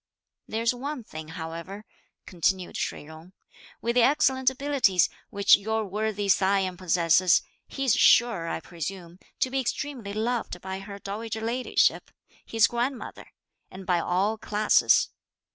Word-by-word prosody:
"There's 230 Hz, +2 st, 0 dB
one 265 Hz, +1 st, -5 dB
thing, 155 Hz, -6 st, -9 dB
however," 165 Hz, +5 st, -7 dB, 0.4 s
continued 180 Hz, +1 st, -1 dB
Shih -, -, -3 dB
Jung; 160 Hz, +4 st, -14 dB, 0.5 s
"with 235 Hz, -, 0 dB
the 245 Hz, -, +4 dB
excellent 265 Hz, -1 st, +3 dB
abilities 265 Hz, -, +2 dB, 0.2 s
which 200 Hz, 0 st, +5 dB
your 220 Hz, +2 st, -2 dB
worthy 210 Hz, +1 st, -2 dB
scion 190 Hz, -1 st, +2 dB
possesses, 175 Hz, 0 st, +3 dB, 0.2 s
he's 270 Hz, -4 st, 0 dB
sure, 230 Hz, -10 st, +4 dB
I -, -, -3 dB
presume, 175 Hz, +1 st, -7 dB, 0.2 s
to 255 Hz, -, +1 dB
be 270 Hz, -, 0 dB
extremely 255 Hz, -4 st, -4 dB
loved 225 Hz, -3 st, -2 dB
by 190 Hz, +1 st, -6 dB
her 200 Hz, +1 st, -9 dB
dowager 220 Hz, +3 st, -5 dB
ladyship, 240 Hz, +3 st, +1 dB, 0.3 s
(his 225 Hz, 0 st, +3 dB
grandmother), 240 Hz, +2 st, -3 dB, 0.4 s
and 190 Hz, 0 st, -10 dB
by 180 Hz, -2 st, +2 dB
all 195 Hz, +6 st, 0 dB
classes. 210 Hz, +1 st, +3 dB
205 Hz, 130 wpm, -26 LUFS, 185-235 Hz, 0.5 s, which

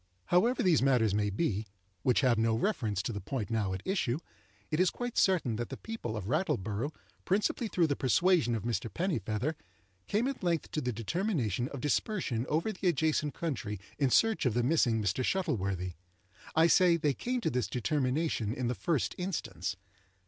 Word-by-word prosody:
However 225 Hz, +8 st, +3 dB
these 175 Hz, -8 st, +4 dB
matters 125 Hz, -6 st, +3 dB
may 105 Hz, 0 st, +1 dB
be 105 Hz, -, -1 dB, 0.3 s
(which 125 Hz, +7 st, +3 dB
have 125 Hz, -4 st, +3 dB
no 115 Hz, 0 st, +2 dB
reference 110 Hz, -, 0 dB
to 115 Hz, -, -3 dB
the 100 Hz, -, -4 dB
point 115 Hz, +2 st, -4 dB
now 105 Hz, -4 st, 0 dB
at 95 Hz, 0 st, -4 dB
issue), 140 Hz, -10 st, 0 dB, 0.5 s
it 155 Hz, -, 0 dB
is 185 Hz, -1 st, +5 dB
quite 245 Hz, -1 st, -5 dB
certain 165 Hz, -, +2 dB
that 120 Hz, 0 st, -3 dB
the -, -, -6 dB
people 220 Hz, -, -5 dB
of 100 Hz, -, -5 dB
Rattleborough, 110 Hz, -, -1 dB, 0.3 s
principally 210 Hz, +4 st, +1 dB
through 180 Hz, -5 st, +2 dB
the 145 Hz, -3 st, 0 dB
persuasion 145 Hz, -2 st, +3 dB
of 110 Hz, -, -3 dB
Mr. 115 Hz, -1 st, -2 dB
Pennifeather, 135 Hz, -, -1 dB, 0.5 s
came 225 Hz, +5 st, +1 dB
at 275 Hz, -, -4 dB
length 170 Hz, -3 st, -1 dB
to 155 Hz, -, -1 dB
the 125 Hz, -, -1 dB
determination 120 Hz, -, -1 dB
of 140 Hz, -2 st, -7 dB
dispersion 145 Hz, -, -1 dB
over 165 Hz, +8 st, +1 dB
the 190 Hz, -2 st, -3 dB
adjacent 155 Hz, -2 st, +1 dB
country 110 Hz, -, -3 dB, 0.2 s
in 140 Hz, -3 st, +3 dB
search 220 Hz, -, +3 dB
of 115 Hz, -, 0 dB
the 120 Hz, -, +2 dB
missing 120 Hz, -6 st, +2 dB
Mr. 100 Hz, +6 st, 0 dB
Shuttleworthy. 100 Hz, -, -1 dB, 0.6 s
I 160 Hz, +1 st, +6 dB
say 175 Hz, 0 st, +5 dB
they 150 Hz, -3 st, +1 dB
came 250 Hz, -, -2 dB
to -, -, 0 dB
this 125 Hz, 0 st, 0 dB
determination 130 Hz, -2 st, 0 dB
in 125 Hz, -2 st, -1 dB
the -, -, +1 dB
first 160 Hz, +2 st, 0 dB
instance. 180 Hz, -, -3 dB
135 Hz, 180 wpm, -31 LUFS, 110-175 Hz, 0.6 s, I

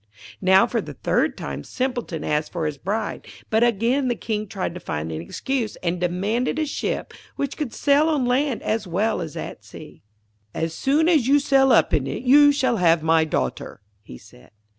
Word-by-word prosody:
Now, 190 Hz, 0 st, +5 dB
for -, -, -1 dB
the -, -, -9 dB
third -, -, 0 dB
time, -, -, -6 dB
Simpleton 245 Hz, -, -3 dB
asked 150 Hz, 0 st, -1 dB
for 170 Hz, -3 st, -3 dB
his 150 Hz, -2 st, -3 dB
bride. 215 Hz, +6 st, -3 dB, 0.2 s
But 220 Hz, +1 st, +3 dB
again 240 Hz, +4 st, +1 dB
the 240 Hz, -, 0 dB
King 215 Hz, -1 st, -3 dB
tried 190 Hz, -4 st, -4 dB
to 180 Hz, -, -7 dB
find 75 Hz, -, -4 dB
an 80 Hz, 0 st, -4 dB
excuse, 230 Hz, -, -3 dB
and 175 Hz, 0 st, -1 dB
demanded 200 Hz, -, -1 dB
a 315 Hz, -, 0 dB
ship 290 Hz, -, -3 dB, 0.2 s
which 280 Hz, 0 st, -3 dB
could 295 Hz, -7 st, -4 dB
sail 290 Hz, +5 st, +2 dB
on 290 Hz, -5 st, +1 dB
land 260 Hz, +1 st, 0 dB
as 215 Hz, -2 st, -1 dB
well 200 Hz, +4 st, 0 dB
as 160 Hz, -3 st, -6 dB
at -, -, -7 dB
sea. -, -, -13 dB, 0.5 s
'As 165 Hz, 0 st, -2 dB
soon 295 Hz, -, +1 dB
as 305 Hz, -9 st, +3 dB
you 280 Hz, +2 st, +5 dB
sail 270 Hz, -2 st, +3 dB
up -, -, +4 dB
in 140 Hz, -4 st, +1 dB
it, 230 Hz, -, -5 dB
you 290 Hz, +3 st, +6 dB
shall 260 Hz, -4 st, +1 dB
have 165 Hz, -3 st, +3 dB
my 160 Hz, 0 st, +3 dB
daughter,' 65 Hz, -, -3 dB, 0.2 s
he 80 Hz, -, -12 dB
said. 60 Hz, -, -18 dB
220 Hz, 195 wpm, -23 LUFS, 170-270 Hz, 0.5 s, you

